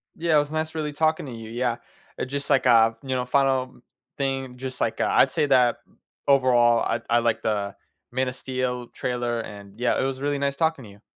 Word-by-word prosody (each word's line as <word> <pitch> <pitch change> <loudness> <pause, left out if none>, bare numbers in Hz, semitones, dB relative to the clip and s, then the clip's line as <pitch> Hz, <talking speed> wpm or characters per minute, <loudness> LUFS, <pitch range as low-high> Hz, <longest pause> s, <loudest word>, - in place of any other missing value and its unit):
Yeah, 160 -2 +2
it - - +7
was 145 0 -2
nice 155 0 -2
really 150 -2 -3
talking 155 +1 +1
to 135 - -7
you, 115 -1 -8
yeah. 120 0 -1 0.5
Just 140 +2 -4
like 135 -2 +3
a, 115 -2 +5
you 135 - -10
know, 130 -1 0
final 130 -1 +1 0.4
thing, 135 -2 -2
just 130 0 -6
like - - 0
a - - +2
I'd - - +4
say - - +1
that 125 -3 +4 0.5
overall 125 -4 +4
I - - -1
I 120 0 +4
like 115 -1 0
the 100 -2 -1 0.4
Man 130 +1 0
of 125 - -4
Steel 125 -2 -3
trailer, 120 -2 -2
and 100 -1 -11
yeah, 125 - +1
it - - 0
was 135 0 -3
really 145 0 0
nice 140 0 0
talking 160 -2 0
to - - -12
you. 100 +1 -18
130 Hz, 215 wpm, -25 LUFS, 120-140 Hz, 0.5 s, it